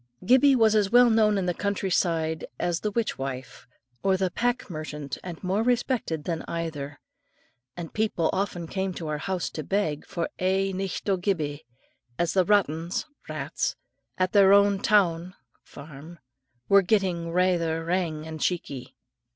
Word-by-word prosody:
Gibbie 265 Hz, +5 st, +6 dB
was 225 Hz, -3 st, +4 dB
as 210 Hz, -2 st, +3 dB
well 245 Hz, +1 st, +6 dB
known 215 Hz, -2 st, +4 dB
in 190 Hz, -, -1 dB
the 180 Hz, -, 0 dB
country 200 Hz, 0 st, -2 dB
side 160 Hz, -3 st, 0 dB
as 175 Hz, -1 st, 0 dB
the 210 Hz, -, -1 dB
witch 220 Hz, -, -2 dB
wife, 130 Hz, -3 st, -6 dB, 0.3 s
or 190 Hz, -1 st, +2 dB
the 185 Hz, -1 st, 0 dB
pack 245 Hz, +6 st, -1 dB
merchant, 150 Hz, -5 st, -6 dB
and 175 Hz, -1 st, -8 dB
more 190 Hz, +3 st, +1 dB
respected 235 Hz, -, 0 dB
than 165 Hz, -1 st, -2 dB
either; 150 Hz, -4 st, -4 dB, 0.8 s
and 170 Hz, -2 st, -7 dB
people 210 Hz, -7 st, 0 dB
often 185 Hz, -3 st, -2 dB
came 190 Hz, +2 st, -3 dB
to 165 Hz, -, -5 dB
our 150 Hz, -1 st, -2 dB
house 185 Hz, +2 st, -2 dB
to 155 Hz, -, -5 dB
beg 155 Hz, -4 st, -1 dB
for 170 Hz, -4 st, -2 dB
"ae 190 Hz, +1 st, +1 dB
nicht 190 Hz, +2 st, -4 dB
o' 195 Hz, -2 st, +2 dB
Gibbie," 155 Hz, -, -2 dB, 0.5 s
as 170 Hz, -1 st, 0 dB
"the 185 Hz, -, +4 dB
rottens 175 Hz, -, +1 dB, 0.2 s
(rats) -, -, -2 dB, 0.4 s
at 185 Hz, 0 st, +1 dB
their 200 Hz, -2 st, +6 dB, 0.3 s
town 185 Hz, -5 st, +2 dB, 0.3 s
(farm) 150 Hz, +3 st, -12 dB, 0.5 s
were 200 Hz, 0 st, +6 dB
gettin' 180 Hz, -4 st, 0 dB
raither 170 Hz, -2 st, +1 dB
thrang 165 Hz, -3 st, -1 dB
and 160 Hz, -1 st, -7 dB
cheeky." 140 Hz, -7 st, -3 dB
180 Hz, 155 wpm, -26 LUFS, 160-200 Hz, 0.8 s, Gibbie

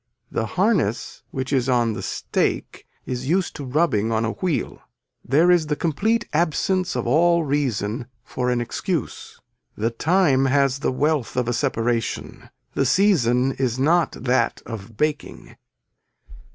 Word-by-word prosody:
The 110 Hz, -, -1 dB
harness 175 Hz, -, 0 dB
which 130 Hz, +1 st, -4 dB
is 130 Hz, -1 st, +1 dB
on 120 Hz, -3 st, +2 dB
the -, -, -5 dB
stake -, -, -2 dB, 0.2 s
is 130 Hz, +1 st, -4 dB
used 185 Hz, +2 st, 0 dB
to 145 Hz, -, -6 dB
rubbing 125 Hz, -6 st, +1 dB
on 110 Hz, 0 st, +1 dB
a 110 Hz, -, -1 dB
wheel. 175 Hz, 0 st, -2 dB, 0.4 s
There 160 Hz, +7 st, +4 dB
is 170 Hz, -3 st, +3 dB
the 150 Hz, -, 0 dB
complete 210 Hz, +9 st, 0 dB
absence 175 Hz, +3 st, 0 dB
of -, -, -2 dB
all 170 Hz, +6 st, +3 dB
reason 120 Hz, -6 st, -1 dB, 0.2 s
for 125 Hz, 0 st, -2 dB
an 125 Hz, -1 st, +1 dB
excuse. 155 Hz, +5 st, -4 dB, 0.4 s
The 115 Hz, +3 st, 0 dB
time 145 Hz, +1 st, +2 dB
has 135 Hz, 0 st, +2 dB
the -, -, 0 dB
wealth 140 Hz, -1 st, 0 dB
of 125 Hz, -2 st, +1 dB
a 120 Hz, -, 0 dB
separation. 115 Hz, 0 st, -2 dB, 0.2 s
The -, -, +1 dB
season 135 Hz, -, +3 dB
is 130 Hz, -3 st, 0 dB
not 160 Hz, +5 st, +2 dB
that 130 Hz, 0 st, 0 dB
of 110 Hz, -1 st, -8 dB
baking. 150 Hz, -1 st, -3 dB
135 Hz, 145 wpm, -22 LUFS, 120-165 Hz, 0.4 s, There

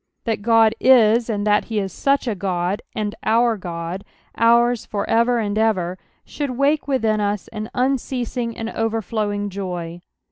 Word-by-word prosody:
That 225 Hz, -2 st, -2 dB
God 225 Hz, 0 st, +4 dB
is, 235 Hz, -2 st, +5 dB
and 205 Hz, -2 st, -1 dB
that 210 Hz, 0 st, +3 dB
he 225 Hz, -, -4 dB
is 195 Hz, -3 st, -2 dB
such 275 Hz, -1 st, +1 dB
a 230 Hz, -, +1 dB
God, 185 Hz, +1 st, -2 dB
and 210 Hz, -1 st, -2 dB
our 230 Hz, +1 st, +2 dB
God, 175 Hz, 0 st, -6 dB, 0.3 s
ours 235 Hz, 0 st, +3 dB
for 200 Hz, -1 st, -4 dB
ever 235 Hz, +2 st, +3 dB
and 210 Hz, -3 st, -1 dB
ever, 185 Hz, -5 st, 0 dB, 0.3 s
should 290 Hz, -2 st, -4 dB
wake 285 Hz, +3 st, +1 dB
withia 225 Hz, -6 st, +1 dB
us 205 Hz, -1 st, -1 dB
an 215 Hz, -1 st, -6 dB
unceasing 250 Hz, -2 st, -1 dB
and 225 Hz, 0 st, -4 dB
overflowing 215 Hz, -2 st, -2 dB
joj. 175 Hz, -3 st, -5 dB
220 Hz, 155 wpm, -21 LUFS, 205-235 Hz, 0.3 s, is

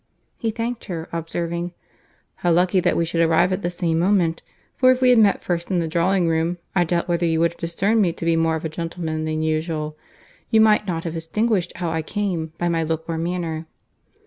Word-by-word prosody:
He 230 Hz, -, -1 dB
thanked 230 Hz, +2 st, -4 dB
her, 170 Hz, -5 st, -5 dB
observing, 170 Hz, +1 st, -3 dB, 0.6 s
"How 175 Hz, -, +1 dB
lucky 180 Hz, +2 st, +3 dB
that -, -, +1 dB
we 170 Hz, -, +2 dB
should 165 Hz, +1 st, 0 dB
arrive 165 Hz, +3 st, +3 dB
at 185 Hz, -, -2 dB
the 175 Hz, -, -1 dB
same 170 Hz, -2 st, -1 dB
moment! 175 Hz, -3 st, +2 dB, 0.3 s
for, 255 Hz, -, +4 dB
if 255 Hz, -, +1 dB
we 255 Hz, -1 st, +5 dB
had 245 Hz, -, +6 dB
met 205 Hz, -2 st, +3 dB
first 170 Hz, -1 st, -2 dB
in 185 Hz, -, +1 dB
the 170 Hz, -1 st, 0 dB
drawing 175 Hz, +2 st, +2 dB
room, 165 Hz, +2 st, 0 dB, 0.2 s
I 180 Hz, -2 st, +3 dB
doubt 170 Hz, +1 st, 0 dB
whether 170 Hz, -1 st, +1 dB
you 160 Hz, -1 st, +1 dB
would 170 Hz, 0 st, +2 dB
have -, -, -25 dB
discerned 195 Hz, +6 st, +1 dB
me 180 Hz, -4 st, +3 dB
to 165 Hz, -, -6 dB
be 165 Hz, 0 st, +3 dB
more 165 Hz, 0 st, +2 dB
of 160 Hz, -, -5 dB
a -, -, +1 dB
gentleman 160 Hz, -1 st, -4 dB
than 155 Hz, 0 st, -1 dB
usual.—You 155 Hz, +6 st, -3 dB
might 215 Hz, -2 st, +4 dB
not 165 Hz, -3 st, -2 dB
have 165 Hz, -, -4 dB
distinguished 180 Hz, +3 st, -1 dB
how 170 Hz, -1 st, -2 dB
I 160 Hz, 0 st, -1 dB
came, 180 Hz, -2 st, -2 dB
by 175 Hz, -, -1 dB
my 165 Hz, -1 st, +1 dB
look 160 Hz, 0 st, -2 dB
or 165 Hz, -1 st, -2 dB
manner." 165 Hz, -2 st, -3 dB
170 Hz, 220 wpm, -22 LUFS, 165-185 Hz, 0.6 s, had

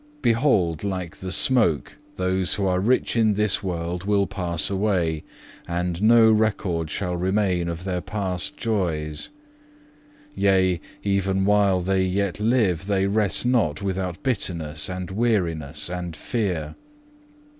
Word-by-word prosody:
Behold, 105 Hz, -, +2 dB
like 95 Hz, -4 st, -4 dB
the 95 Hz, -1 st, -6 dB
smoke 110 Hz, -, +2 dB, 0.2 s
those 95 Hz, 0 st, 0 dB
who 100 Hz, -, -1 dB
are 90 Hz, -1 st, +1 dB
rich 120 Hz, +6 st, +1 dB
in 110 Hz, -3 st, +3 dB
this 105 Hz, -1 st, +1 dB
world 90 Hz, -1 st, -3 dB
will 100 Hz, 0 st, +2 dB
pass 85 Hz, -5 st, -1 dB
away, 95 Hz, -6 st, 0 dB, 0.4 s
and 85 Hz, +1 st, -2 dB
no 110 Hz, +1 st, +6 dB
record 100 Hz, -7 st, 0 dB
shall 90 Hz, +2 st, -2 dB
remain 95 Hz, -1 st, 0 dB
of 85 Hz, +1 st, -5 dB
their 90 Hz, -2 st, -2 dB
past 95 Hz, +7 st, -3 dB
joys. 85 Hz, -9 st, -1 dB, 1.0 s
Yea, 95 Hz, -3 st, +2 dB, 0.2 s
even 95 Hz, -1 st, +1 dB
while 100 Hz, -2 st, +3 dB
they 95 Hz, +1 st, +1 dB
yet 95 Hz, +1 st, -1 dB
live, 105 Hz, -6 st, +1 dB
they 95 Hz, -2 st, +1 dB
rest 100 Hz, +2 st, +1 dB
not 105 Hz, -, +1 dB
without 95 Hz, -3 st, -3 dB
bitterness 85 Hz, -, -2 dB
and 90 Hz, 0 st, -5 dB
weariness 85 Hz, -9 st, 0 dB
and 90 Hz, -2 st, -5 dB
fear. 85 Hz, -5 st, -2 dB
95 Hz, 130 wpm, -24 LUFS, 85-105 Hz, 1.0 s, no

